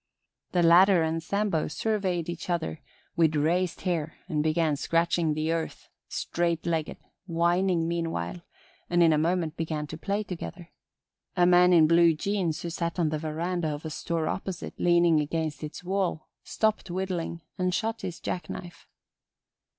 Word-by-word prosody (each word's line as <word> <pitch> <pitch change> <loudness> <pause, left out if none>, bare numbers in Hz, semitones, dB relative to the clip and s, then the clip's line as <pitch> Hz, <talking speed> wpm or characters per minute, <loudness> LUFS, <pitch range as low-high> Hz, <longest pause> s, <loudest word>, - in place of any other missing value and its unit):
The 175 -1 +3
latter 175 +1 +6
and 160 +1 -1
Sambo 200 -2 0
surveyed 185 -1 -1
each 175 +1 -6
other 165 -2 -2 0.3
with 160 -3 +3
raised 170 +4 +1
hair 165 -4 -2
and 155 -5 0
began 155 0 +1
scratching 165 +1 +1
the 155 +1 0
earth, 165 -1 -4 0.2
straight 170 -1 -1
legged, 165 -2 -1 0.3
whining 170 0 +2
meanwhile, 165 - -2 0.5
and 175 0 +4
in 165 -1 +5
a 150 - +2
moment 165 0 0
began 155 -2 -2
to 155 +2 -8
play 200 +3 -1
together. 175 -2 -7 0.7
A 175 - +5
man 180 0 +6
in 165 -3 +7
blue 165 0 +5
jeans 175 -2 -1
who 170 - -3
sat 170 +1 -3
on 165 -3 +2
the 155 0 -2
veranda 165 +2 -2
of 150 +1 -4
a 160 - -4
store 165 0 -2
opposite, 190 -2 -4
leaning 175 -2 +4
against 155 +1 -2
its 150 +3 -7
wall, 185 -3 -1
stopped 215 -3 0
whittling 175 -2 -3 0.2
and 185 0 +1
shut 225 +5 -2
his 175 - -5
jacknife. 175 0 -6
170 Hz, 155 wpm, -27 LUFS, 160-180 Hz, 0.7 s, in